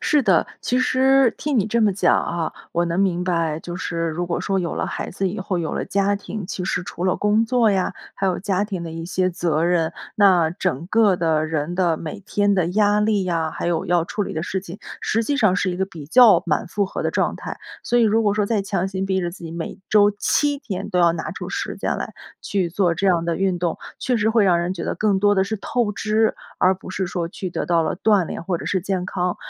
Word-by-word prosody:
是 295 -2 +2
的， - - +3
其 250 - 0
实 260 0 +4
听 290 -4 0
你 205 - +2
这 230 +2 +1
么 215 -2 +4
讲 190 - +3
啊， 170 -2 -3 0.2
我 170 +1 +1
能 170 +2 -1
明 180 -2 +1
白， 165 -4 0
就 175 - -7
是 165 -2 -2
如 170 +2 -3
果 170 - -1
说 195 -1 0
有 175 -3 -2
了 - - -1
孩 - - -4
子 195 +1 -2
以 195 - -5
后， 190 0 -2
有 165 -2 -3
了 - - -2
家 200 +1 +1
庭， 200 -1 -6
其 185 -2 -4
实 180 - -1
除 175 0 -6
了 185 - +2
工 210 +2 +2
作 240 -2 +3
呀， 190 -2 0 0.2
还 195 - -1
有 185 -2 0
家 200 0 0
庭 195 -4 -5
的 165 - -6
一 165 +1 -6
些 185 +1 0
责 165 -3 0
任， 170 -2 +1 0.2
那 185 -6 +5
整 165 -3 -2
个 210 -3 +4
的 160 -2 +1
人 160 +2 -2
的 175 -3 +2
每 170 +7 -7
天 205 +1 +1
的 185 -4 +1
压 205 +3 +2
力 210 -2 +1
呀， 165 -3 -1
还 - - -4
有 170 -1 0
要 175 -1 +2
处 205 +4 -3
理 - - -5
的 160 - -2
事 190 +2 -2
情， 185 +1 -10 0.2
实 225 +1 0
际 285 +3 0
上 210 -8 +3
是 190 -1 0
一 175 - -4
个 190 - 0
比 160 -6 -10
较 210 - +6
满 155 -5 0
负 200 +3 -1
荷 190 - -4
的 - - 0
状 - - 0
态。 - - -7 0.2
所 240 - +1
以 - - +4
如 225 0 +3
果 205 -1 +2
说 210 - +1
再 210 0 0
强 195 -2 -1
行 190 0 -3
逼 190 -1 0
着 175 -1 -2
自 175 - -12
己， 165 - -6
每 165 0 -6
周 205 -1 +5
7 290 +4 +1
天 200 -8 -5
都 180 - 0
要 170 -1 +5
拿 170 - -4
出 - - -6
时 - - -3
间 - - -2
来， - - -5 0.3
去 190 -4 -1
做 175 0 +1
这 190 +4 -1
样 170 -3 +3
的 170 -1 -1
运 190 -2 0
动， 175 -2 -1 0.2
确 250 - 0
实 215 +1 +2
会 220 -1 +3
让 180 -3 +4
人 180 +2 -2
觉 170 - -5
得 - - -2
更 205 -3 +1
多 205 +1 +3
的 190 - +3
是 210 +3 -2
透 230 +2 -1
支， 215 +1 +1 0.2
而 185 +1 +4
不 185 - -11
是 185 0 -2
说 175 -1 -3
去 185 +1 -5
得 - - -3
到 170 -2 +2
了 160 - -2
锻 205 -3 +3
炼 - - -6
或 175 -1 -1
者 - - -7
是 185 - 0
健 185 -2 -2
康， 180 -1 -1
190 Hz, 275 characters per minute, -22 LUFS, 170-205 Hz, 0.3 s, 较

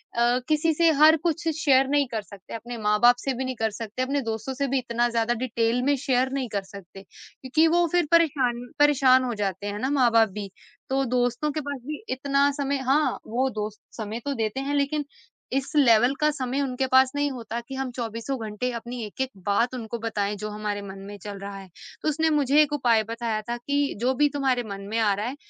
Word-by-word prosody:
अ, 240 +1 +3
किसी 310 +1 +2
से 335 +1 +4
हर 315 +1 +8
कुछ 335 0 -1
शेयर 270 -3 +4
नहीं 285 -1 +2
कर 220 -2 -2
सकते, 200 -2 -13
अपने 235 +1 -6
माँ-बाप 210 +3 +4
से 270 - -2
भी 260 +1 -3
नहीं 255 0 -3
कर 225 -1 -1
सकते। 225 +3 -5
अपने 280 +2 -1
दोस्तों 225 +2 -4
से 280 +1 -1
भी 270 +1 0
इतना 240 -1 0
ज़्यादा 230 0 +1
डिटेल 235 0 0
में 285 +2 +3
शेयर 260 -1 +1
नहीं 265 -3 -2
कर 200 -1 -1
सकते, 195 -1 -12
क्योंकि 270 +10 -1
वो 345 - +4
फिर 350 -3 +2
परेशान 265 -8 +2
परेशान 265 -3 +5
हो 245 - -2
जाते 195 +1 -3
हैं 205 0 -4
ना 260 - -1
माँ-बाप 230 -3 +5
भी। 200 -1 -5 0.4
तो 270 +1 +1
दोस्तों 245 +4 0
के 305 - -3
पास 285 -1 -5
भी 300 +7 -6
इतना 275 +2 +2
समय 280 0 0
हाँ, 300 +2 +2
वो 255 +4 0
दोस्त 215 -3 -5 0.2
समय 220 0 -4
तो 285 - -1
देते 220 +1 -2
हैं 280 +2 -2
लेकिन 290 +1 0 0.5
इस 270 +1 -1
लेवल 245 -3 +5
का 300 - +3
समय 270 -1 -2
उनके 265 -1 -1
पास 260 0 +5
नहीं 290 0 0
होता 235 -2 -5
कि 270 - -6
हम 265 -1 -3
चौबीसों 230 +2 -4
घंटे 215 +4 -3
अपनी 235 +1 -5
एक-एक 260 +5 -4
बात 230 +5 +1
उनको 235 -1 -5
बताएँ 210 -2 -2
जो 215 - -2
हमारे 210 -1 -3
मन 195 -1 -9
में 205 0 -8
चल 205 -1 -7
रहा 200 0 -7
है। 195 -1 -11 0.3
तो - - +2
उसने 320 +2 +1
मुझे 295 -1 +4
एक 300 -1 +1
उपाय 235 -6 +3
बताया 230 -2 -2
था 240 - -1
कि 285 +3 -1
जो 255 +2 +2
भी 295 - +5
तुम्हारे 265 -4 +1
मन 200 0 -6
में 225 - -1
आ 210 -3 +3
रहा 205 +2 -3
है, 255 +3 -4
250 Hz, 220 wpm, -25 LUFS, 220-280 Hz, 0.5 s, हर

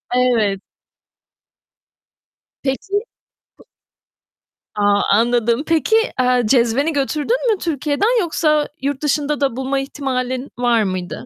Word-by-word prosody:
Evet. 225 -6 +2 2.0
Peki. 385 +10 -1 0.6
P - - -20 1.1
A 205 -1 0 0.3
anladım. 235 +3 +2
Peki, 330 +7 +2 0.2
eee, 250 -1 +3
cezveni 250 +6 +2
götürdün 305 - 0
mü - - -3
Türkiye'den? 330 - 0
Yoksa 305 -3 +1
yurt 280 0 -2
dışında 295 0 -1
da 270 -4 +1
bulma 265 +1 -1
ihtimalin 260 -1 -3
var 240 -3 +2
mıydı? 185 -2 -4
270 Hz, 100 wpm, -19 LUFS, 240-300 Hz, 2.0 s, eee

